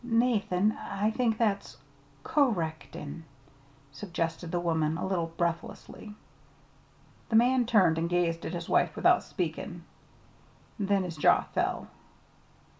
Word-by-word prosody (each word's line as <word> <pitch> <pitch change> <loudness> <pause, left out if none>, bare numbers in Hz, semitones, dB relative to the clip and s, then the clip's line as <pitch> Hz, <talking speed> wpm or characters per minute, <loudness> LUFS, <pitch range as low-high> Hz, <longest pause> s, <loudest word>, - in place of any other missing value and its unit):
"Nathan, 225 -5 +2
I 200 +2 -1
I - - -2
think 225 -1 0
that's 210 -4 -1 0.5
'co 285 -3 +3
rectin','" 160 -3 -5 0.7
suggested 165 +1 -4
the 175 - 0
woman, 160 -2 0
a - - -3
little 175 -4 -1
breathlessly. 170 +5 -4 1.1
The 225 - 0
man 245 +1 +4
turned 185 -9 +4
and 170 +1 -1
gazed 170 -1 0
at - - -4
his 170 -1 -5
wife - - +2
without - - +4
speaking. 170 -1 -4 1.0
Then 200 -1 +1
his 170 -3 -6
jaw 150 - +5
fell. - - -2
180 Hz, 125 wpm, -29 LUFS, 165-215 Hz, 1.1 s, jaw